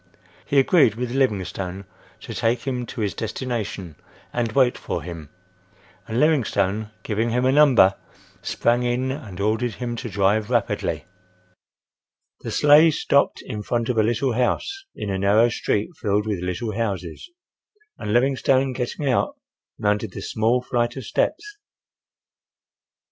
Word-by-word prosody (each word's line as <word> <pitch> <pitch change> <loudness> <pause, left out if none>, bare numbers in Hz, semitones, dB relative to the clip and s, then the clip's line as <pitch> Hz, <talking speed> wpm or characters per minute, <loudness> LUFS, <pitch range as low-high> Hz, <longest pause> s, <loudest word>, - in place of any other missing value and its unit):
He 140 - +1
agreed 135 - +5
with 120 +1 -3
Livingstone 100 -7 -1 0.4
to - - -7
take 115 +1 0
him 125 -3 -3
to 120 - -6
his 105 -2 -1
destination 110 - -4 0.4
and 120 -2 -1
wait 130 -3 +4
for - - -4
him, 85 -4 -8 0.8
and 115 +2 -1
Livingstone, 110 -9 +1
giving 110 +2 -1
him 125 +2 +1
a 130 - +4
number, 135 -9 +6 0.5
sprang 120 +1 +1
in 125 +2 0
and 115 -10 -7
ordered 110 +2 0
him 120 -1 -4
to 120 0 -5
drive 105 +1 +1
rapidly. - - -1 1.3
The - - -6
sleigh 150 +3 +6
stopped 140 -2 +1
in 105 - -5
front 115 +2 -1
of 125 - 0
a - - +6
little 120 +4 +1
house, 390 - -1
in 100 - -4
a 95 - -2
narrow 105 +4 +4
street 110 - -1
filled 105 0 +1
with 105 -4 -2
little 100 +5 -3
houses, 95 - -4 0.7
and 105 - -4
Livingstone 130 +2 +2
getting 125 +3 -3
out 130 - +1 0.4
mounted 105 0 0
the - - -6
small 115 +3 0
flight 120 -1 -1
of 135 - -6
steps. - - 0
115 Hz, 145 wpm, -23 LUFS, 105-130 Hz, 1.3 s, number